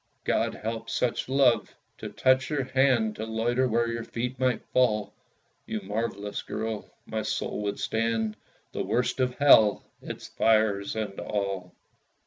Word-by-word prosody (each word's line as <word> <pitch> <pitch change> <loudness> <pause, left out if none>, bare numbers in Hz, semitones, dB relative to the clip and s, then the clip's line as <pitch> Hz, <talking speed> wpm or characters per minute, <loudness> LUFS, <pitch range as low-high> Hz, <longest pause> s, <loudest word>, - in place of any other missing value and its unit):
God - - 0
help 115 +1 -5
such 125 +1 -1
love! 130 -5 +3 0.2
To - - -5
touch 130 0 +2
your 145 -3 0
hand, 130 -4 +2
To 110 - -4
loiter 115 +3 0
where 115 0 +1
your 115 0 -3
feet 125 +2 -4
might 130 -2 +1
fall, 110 -5 +2 0.5
You 110 - -2
marvellous 105 0 -3
girl, 110 -1 -4 0.2
my 110 0 -3
soul 105 0 -2
would 100 -1 -2
stand 110 -1 -1 0.4
The - - -3
worst 125 +2 0
of 125 -1 +1
hell 110 -7 +6 0.2
its - - -7
fires 110 -3 +2
and 105 -3 -4
all! 100 -3 -3
115 Hz, 145 wpm, -27 LUFS, 105-125 Hz, 0.5 s, hell